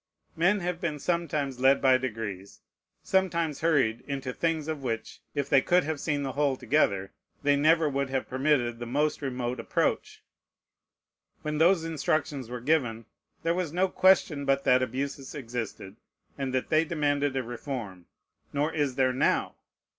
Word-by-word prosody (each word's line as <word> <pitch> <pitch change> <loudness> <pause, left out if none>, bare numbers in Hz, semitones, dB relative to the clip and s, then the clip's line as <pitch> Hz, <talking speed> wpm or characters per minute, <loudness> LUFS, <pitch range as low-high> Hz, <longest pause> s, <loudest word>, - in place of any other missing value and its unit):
Men 190 +5 +2
have 175 0 -3
been 160 -4 -2
sometimes 150 -5 -1
led 135 +1 +5
by 130 -1 +4
degrees, 105 -6 -5 0.4
sometimes 170 -6 0
hurried, 145 -9 +2
into 135 -2 -3
things 160 -1 -1
of 155 -3 -3
which, 115 -4 -4
if 140 -1 -1
they 135 - +5
could 180 +4 +3
have 155 0 -3
seen 145 -2 -1
the 135 - -2
whole 140 -1 +1
together, 110 -7 +1 0.3
they 145 0 +4
never 155 +2 +4
would 140 -1 -1
have 135 0 -2
permitted 130 -3 +1
the 120 - -5
most 150 +6 0
remote 125 -2 -3
approach. 115 - -1 1.2
When 150 0 -2
those 170 +1 +4
instructions 150 -4 -1
were 125 -1 -5
given, 120 -6 0 0.4
there 165 - +2
was 175 -3 -2
no 185 +2 +2
question 180 -7 +3
but 135 0 +1
that 125 0 +4
abuses 135 +2 -4
existed, 115 -6 -6 0.4
and 135 -2 -3
that 130 0 -1
they 155 0 +4
demanded 145 -3 0
a 130 - 0
reform: 115 -7 -6 0.4
nor 145 +2 0
is 145 -4 0
there 130 -1 +2
now. 130 - +1
140 Hz, 160 wpm, -28 LUFS, 125-155 Hz, 1.2 s, led